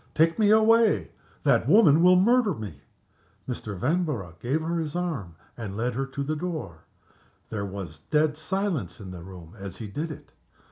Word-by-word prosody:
"Take 165 +5 +3
me 210 -2 +4
away! 220 +1 +4 0.3
That - - +3
woman 165 -8 +6
will 180 +1 +7
murder 220 +2 +4
me!" 100 -11 -8 0.7
Mr. 110 -5 -5
Vanborough 130 - -1
gave 135 +6 0
her 170 +1 -1
his 160 -1 -4
arm 145 - -3 0.2
and 105 -4 -6
led 120 +2 -1
her 135 +3 -2
to 140 +1 -4
the 155 +3 -2
door. 155 - -5 0.7
There 100 -2 -3
was 95 -5 -7
dead 150 - +1
silence 190 -3 -2
in 95 -3 -8
the 90 -2 -8
room 90 -1 -11
as 95 -1 -7
he 110 - -6
did 150 +11 -4
it. 155 - -10
145 Hz, 175 wpm, -26 LUFS, -, 0.7 s, will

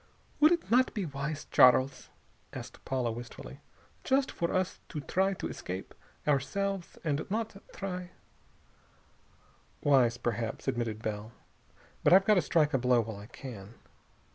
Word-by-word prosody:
"Would 305 +2 +7
it 340 -7 0
not 255 +2 +4
be 205 -4 -1
wise, 145 +1 -4
Charles," 130 +1 +5 0.4
asked - - -9
Paula 125 -3 0
wistfully, 115 - -8 0.4
"just 265 0 +2
for 170 - -2
us 185 -1 -1
to 155 - -4
try 190 +7 +1
to - - -4
escape, 95 +1 -6 0.3
ourselves, 175 +7 -1
and 150 -1 0
not 215 -1 -3
try 180 -2 -5 0.9
" - - -34
"Wise, 130 -5 +4
perhaps," 115 -1 -3
admitted 115 -2 -2
Bell, 110 +1 -4 0.7
"but - - +6
I've 190 +1 +7
got 215 - +6
to 185 - +4
strike 155 -3 +2
a 135 - +3
blow 125 -1 +4
while 110 -2 -6
I 100 +1 -10
can." 115 -5 -9
140 Hz, 145 wpm, -30 LUFS, 120-190 Hz, 0.9 s, Would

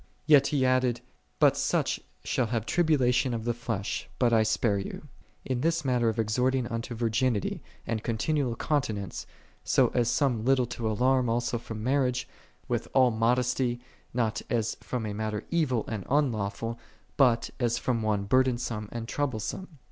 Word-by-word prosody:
" - - -24 0.2
16. 155 - +5
Yet 140 -1 +7
he 140 -3 +1
added, 130 -2 +2 0.4
"But - - +5
such - - 0 0.2
shall 125 - 0
have 115 -1 -2
Iribulalion 130 -5 +2
of 115 -1 -5
the 120 - +1
flesh, 115 -4 -4
bul 120 -2 +3
I 110 - +5
spare 110 -1 +1
you: 100 +9 -7 0.4
"8 - - -5
in 125 -1 0
this 165 0 +1
manner 125 -3 +2
exhorting 120 +4 +1
unto 115 0 -4
virginity, 115 -1 0 0.2
and 110 -2 -2
con 115 -1 -1
tinual 135 -3 0
continence, 110 - -2 0.4
so - - +3
as 120 -2 +1
some 125 -7 +1
little 130 0 +3
to 115 -1 -3
alarm 125 +3 +2
also 120 0 0
from 110 -2 -7
marriage, 125 -1 +1 0.4
with - - -1
all 130 -2 +5
modesty, 120 +2 +1 0.3
not 115 -3 -1
as 115 -2 0
from 125 -3 -3
a 105 - -3
mailer 110 0 -3
evil 145 -9 +1
and 110 -4 -4
unlawful, 115 -4 0 0.4
but 120 -4 +3
as 120 -2 +1
from 120 -1 -1
one 105 -2 0
burdensome 120 -2 +1
and 115 -1 -5
troublesome. 130 - -3
120 Hz, 165 wpm, -28 LUFS, 110-130 Hz, 0.4 s, Yet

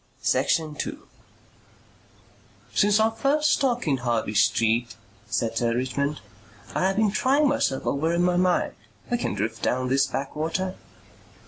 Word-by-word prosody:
"Go - - -38
on." - - -30
Section 160 -2 +1
2 150 - -6 1.7
"Since 205 +1 +3
our 220 +1 +3
first 290 +7 +1
talk 245 - 0
in 140 -3 +2
Harley 120 -4 -1
Street," 115 +3 +2 0.3
said 115 -1 -1
Sir 115 0 +1
Richmond, 140 +4 -2 0.5
"I 185 - +1
have 195 - 0
been 215 -1 +2
trying 275 +7 +2
myself 140 - 0
over 155 +4 0
in 170 +1 +1
my 180 0 +2
mind. 180 0 +2 0.4
(We 240 - +1
can - - -2
drift 110 0 -3
down 130 0 0
this 135 +1 +3
backwater.)" 160 +7 -3
155 Hz, 150 wpm, -25 LUFS, 125-210 Hz, 1.7 s, Since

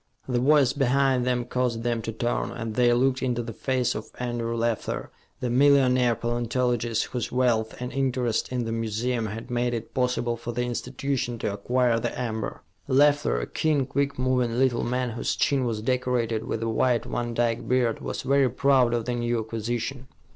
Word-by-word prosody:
The 125 -2 +1
voice 135 0 +4
behind 135 -2 +2
them 125 -1 0
caused 125 -2 -1
them 120 -1 0
to 115 - -4
turn, 120 +2 -1
and 115 -1 -5
they 120 +1 +4
looked 130 +2 +2
into 120 -2 -1
the 115 -1 -6
face 130 0 0
of 110 - -6
Andrew 120 -1 -2
Leffler, 115 -1 -2 0.3
the 125 - -1
millionaire 130 -2 +4
paleontologist, 120 0 0
whose 125 -3 -3
wealth 120 -3 +1
and 125 0 -4
interest 130 -4 0
in 125 -2 -1
the 115 - -3
museum 115 +1 -1
had 110 +3 -7
made 120 0 0
it 115 0 -6
possible 125 -2 0
for 120 +1 -6
the 120 +1 -1
institution 125 0 -2
to 105 - -2
acquire 120 +3 +1
the - - -3
amber. 110 -3 -4 0.2
Leffler, 145 - +3
a - - -2
keen, 150 - 0
quick 140 +1 -1
moving 125 -2 +1
little 130 -2 +2
man, 125 0 -1
whose 115 - -2
chin 135 -3 +1
was 110 -3 -2
decorated 120 -3 0
with 115 - -2
a - - -1
white 115 +1 +1
Van 120 -1 -3
Dyke 115 -1 0
beard, 125 -3 +1
was - - -4
very 140 -1 +3
proud 130 -1 +3
of 115 -2 -2
the 125 - -1
new 120 -1 0
acquisition. 115 +4 -4
120 Hz, 185 wpm, -26 LUFS, 115-130 Hz, 0.3 s, voice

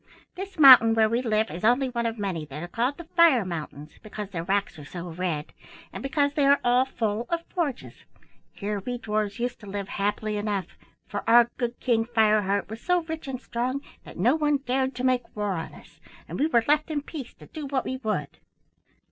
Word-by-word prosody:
This 385 +1 -8
mountain 250 -6 +9
where 220 -1 +4
we 230 +3 0
live 220 -2 0
is 170 +5 -7
only 250 +4 +3
one 235 -1 -1
of 225 0 -4
many 190 -6 -3
that 150 +3 -7
are - - -5
called 240 +10 -1
the 345 - -8
Fire 325 - +4
Mountains, 155 -3 -7
because 210 -2 -7
their 170 -4 -3
rocks 195 -2 -1
are - - -9
so 175 +4 -7
red, 165 -3 -3 0.4
and - - -6
because 285 +1 0
they 290 -2 +2
are 280 0 +5
all 245 +1 +4
full 225 -3 -2
of 335 0 -2
forges. 300 -8 -2 0.6
Here 205 0 -3
we 245 +5 -4
dwarfs 210 -3 -2
used 245 0 -2
to 210 - -12
live 200 0 -5
happily 210 +1 -1
enough, 205 -2 -3 0.3
for - - -4
our 235 0 +6
good 240 -1 -3
King 230 -3 +1
Fireheart 215 -4 +2
was 220 +2 -8
so 360 -1 +2
rich 320 -2 -6
and 260 -2 -4
strong 255 +2 -3 0.2
that - - -12
no 225 +9 +3
one 295 -2 +2
dared 260 +1 0
to 250 - -4
make 255 -1 0
war 210 -1 -1
on 165 -3 -4
us, - - -17 0.3
and - - -6
we 295 - +3
were 235 -7 +2
left 300 +2 +2
in 295 -2 -2
peace 285 -5 -8
to - - -15
do 305 -3 -7
what 270 -2 -1
we 260 - -3
would. 210 - -3
235 Hz, 215 wpm, -26 LUFS, 205-270 Hz, 0.6 s, mountain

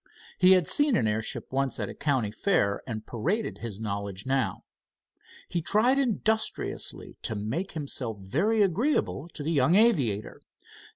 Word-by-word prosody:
He 185 +1 +7
had 180 -3 +4
seen 290 - +3
an 110 - +2
airship 110 +1 -3
once 135 -3 0
at 105 - -2
a - - -7
county 135 -8 0
fair 105 - +1
and 110 -3 -5
paraded 175 - -2
his 110 -4 -6
knowledge 100 -2 -4
now. 130 -7 -1 0.8
He 170 - -2
tried 230 - +3
industriously 220 -3 -1
to 110 - -2
make 115 - -3
himself 135 - -4
very 180 - +1
agreeable 195 - 0
to 150 - -6
the 160 - -1
young 150 +2 +3
aviator. 140 - +2
140 Hz, 150 wpm, -27 LUFS, -, 0.8 s, He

